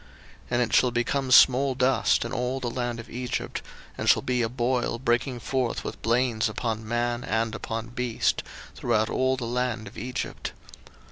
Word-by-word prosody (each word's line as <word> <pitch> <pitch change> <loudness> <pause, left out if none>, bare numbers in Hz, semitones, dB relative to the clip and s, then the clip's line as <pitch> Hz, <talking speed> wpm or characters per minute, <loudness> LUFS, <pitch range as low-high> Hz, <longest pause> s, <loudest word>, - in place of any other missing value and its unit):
02:009:009 - - -23 0.4
And 120 0 +1
it 120 - -4
shall 125 - +5
become 125 +3 -1
small 130 +1 +6
dust 130 -2 +2
in 115 - -5
all 125 +1 -1
the 120 -2 -3
land 120 -1 -3
of 115 - -8
Egypt, 125 +1 -4 0.3
and - - 0
shall - - +5
be 125 -1 0
a 115 - 0
boil 120 0 0
breaking 120 +1 0
forth 130 0 -1
with - - -6
blains 115 -1 +1
upon 110 0 -3
man, 120 +1 -1
and 110 0 0
upon 115 0 -4
beast, 120 -1 0 0.3
throughout 110 +1 0
all 130 0 +1
the 125 - -4
land 120 -2 -1
of 100 - -9
Egypt. 125 0 -4
120 Hz, 180 wpm, -26 LUFS, 115-125 Hz, 0.4 s, small